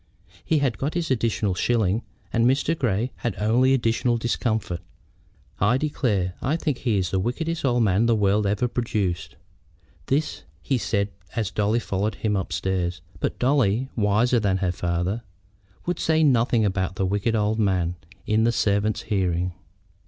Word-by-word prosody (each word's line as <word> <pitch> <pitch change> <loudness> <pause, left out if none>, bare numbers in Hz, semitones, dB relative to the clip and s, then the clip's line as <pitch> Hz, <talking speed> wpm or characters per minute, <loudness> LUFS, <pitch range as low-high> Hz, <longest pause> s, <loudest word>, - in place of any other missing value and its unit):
He 160 - +1
had 135 -5 0
got 145 +4 -2
his 170 -5 -1
additional 110 -5 +1
shilling, 110 +1 +1 0.3
and 115 0 +3
Mr. 140 +5 +2
Grey 120 -3 0
had 115 -6 -2
only 120 +5 +3
additional 120 -1 +2
discomfort. 110 -6 -1 0.8
"I 110 +6 +3
declare 110 -11 0
I 140 +5 +1
think 150 -5 -2
he 115 -5 +1
is 90 -3 -1
the 95 - +1
wickedest 160 - -2
old 120 -3 +2
man 105 +3 +3
the 115 - +4
world 105 0 +2
ever 105 +5 +1
produced." 105 -8 -2 0.7
This 145 +3 0 0.2
he 135 -3 -1
said 100 -2 0 0.3
as 110 -4 -1
Dolly 105 +2 +1
followed 105 0 -2
him 105 -2 -1
upstairs; 90 -2 -2 0.2
but - - -2
Dolly, 130 -2 +2
wiser 110 +3 +3
than 100 -3 +1
her 95 -2 0
father, 90 +5 -1 0.6
would 175 - -2
say 160 0 +2
nothing 120 -5 +3
about 95 -2 -1
the 95 - 0
wicked 105 +4 0
old 110 +1 +1
man 90 -5 +1 0.3
in 110 +1 +2
the 120 - +3
servants' 105 -1 +1
hearing. 90 -3 0
110 Hz, 160 wpm, -24 LUFS, 95-125 Hz, 0.8 s, the